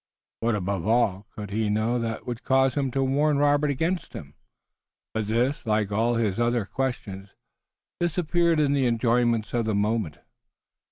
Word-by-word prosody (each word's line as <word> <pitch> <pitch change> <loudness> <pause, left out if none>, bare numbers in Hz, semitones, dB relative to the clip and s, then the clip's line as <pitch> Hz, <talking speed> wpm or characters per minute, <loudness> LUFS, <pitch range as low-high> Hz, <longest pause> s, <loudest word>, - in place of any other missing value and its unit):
What, 115 -1 +1
above 100 -1 -2
all, 110 -4 +1
could 105 -3 -8
he 110 +1 0
know 110 +4 +1
that 115 -1 -4
would 120 -1 -5
cause 135 -1 +2
him 135 -1 0
to 135 +2 0
warn 145 +2 +2
Robert 145 +1 +3
against 165 +6 -2
him? 70 -1 -9 0.8
But 110 -2 -2
this, 120 +6 0
like 105 -2 0
all 115 +3 +1
his 110 -3 0
other 120 -2 +1
questions, 100 -6 -4 0.7
disappeared 170 -1 +1
in 145 -2 +2
the 135 -3 +2
enjoyments 115 -1 +1
of 120 -2 0
the 110 -2 0
moment. 105 -6 -1
120 Hz, 160 wpm, -25 LUFS, 105-135 Hz, 0.8 s, Robert